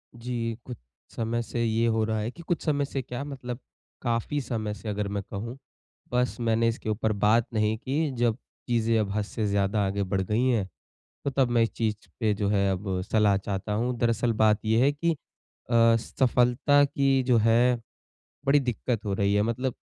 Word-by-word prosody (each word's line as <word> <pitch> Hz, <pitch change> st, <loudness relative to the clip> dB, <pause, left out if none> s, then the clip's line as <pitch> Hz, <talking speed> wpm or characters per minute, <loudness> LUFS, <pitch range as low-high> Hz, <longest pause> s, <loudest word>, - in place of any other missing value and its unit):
जी 115 Hz, -1 st, -3 dB
कुछ 125 Hz, -2 st, -7 dB, 0.4 s
समय 115 Hz, +1 st, -1 dB
से 115 Hz, 0 st, -2 dB
ये 115 Hz, 0 st, +1 dB
हो 110 Hz, -1 st, +2 dB
रहा 110 Hz, 0 st, -1 dB
है 110 Hz, +3 st, -2 dB
कि 170 Hz, -, -12 dB
कुछ 175 Hz, -, -1 dB
समय 145 Hz, -2 st, +1 dB
से 135 Hz, 0 st, -3 dB
क्या 125 Hz, +2 st, -5 dB
मतलब 130 Hz, -4 st, -6 dB, 0.4 s
काफ़ी 120 Hz, +4 st, -1 dB
समय 110 Hz, -5 st, -3 dB
से 105 Hz, +1 st, -7 dB
अगर 105 Hz, 0 st, -2 dB
मैं 100 Hz, 0 st, -3 dB
कहूँ 115 Hz, +5 st, -5 dB, 0.5 s
बस 125 Hz, 0 st, 0 dB
मैंने 115 Hz, 0 st, +2 dB
इसके 115 Hz, -1 st, -2 dB
ऊपर 110 Hz, +1 st, 0 dB
बात 105 Hz, +3 st, +3 dB
नहीं 110 Hz, 0 st, +1 dB
की 145 Hz, +5 st, -1 dB
जब 120 Hz, -2 st, +2 dB, 0.3 s
चीज़ें 115 Hz, -2 st, +2 dB
अब 105 Hz, -2 st, -1 dB
हद 105 Hz, -, +1 dB
से 110 Hz, +1 st, -3 dB
ज़्यादा 100 Hz, +1 st, +1 dB
आगे 100 Hz, +1 st, -1 dB
बढ़ 95 Hz, 0 st, -1 dB
गई 105 Hz, +6 st, 0 dB
हैं, 115 Hz, -7 st, +1 dB, 0.6 s
तो -, -, +2 dB
तब 135 Hz, -2 st, +2 dB
मैं 120 Hz, -1 st, +3 dB
इस 115 Hz, -, -1 dB
चीज़ 110 Hz, -2 st, -2 dB
पे 110 Hz, -3 st, +2 dB
जो 100 Hz, 0 st, -1 dB
है 100 Hz, -1 st, +2 dB
अब 95 Hz, -1 st, -2 dB
सलाह 105 Hz, -2 st, +4 dB
चाहता 100 Hz, +1 st, -3 dB
हूँ। 120 Hz, +4 st, 0 dB
दरअसल 115 Hz, -1 st, +1 dB
बात 110 Hz, -1 st, +3 dB
ये 110 Hz, +1 st, +3 dB
है 140 Hz, +2 st, +4 dB
कि 165 Hz, +4 st, 0 dB, 0.6 s
अ, 115 Hz, -1 st, +5 dB
सफलता 125 Hz, +4 st, +3 dB
की 135 Hz, -1 st, +2 dB
जो 125 Hz, -2 st, +3 dB
है 115 Hz, +2 st, +3 dB, 0.7 s
बड़ी 140 Hz, +2 st, +5 dB
दिक्कत 125 Hz, -3 st, -2 dB
हो 100 Hz, -, -1 dB
रही 100 Hz, +1 st, +1 dB
है। 105 Hz, -, +3 dB
मतलब 120 Hz, +3 st, -1 dB
115 Hz, 195 wpm, -27 LUFS, 105-125 Hz, 0.7 s, अ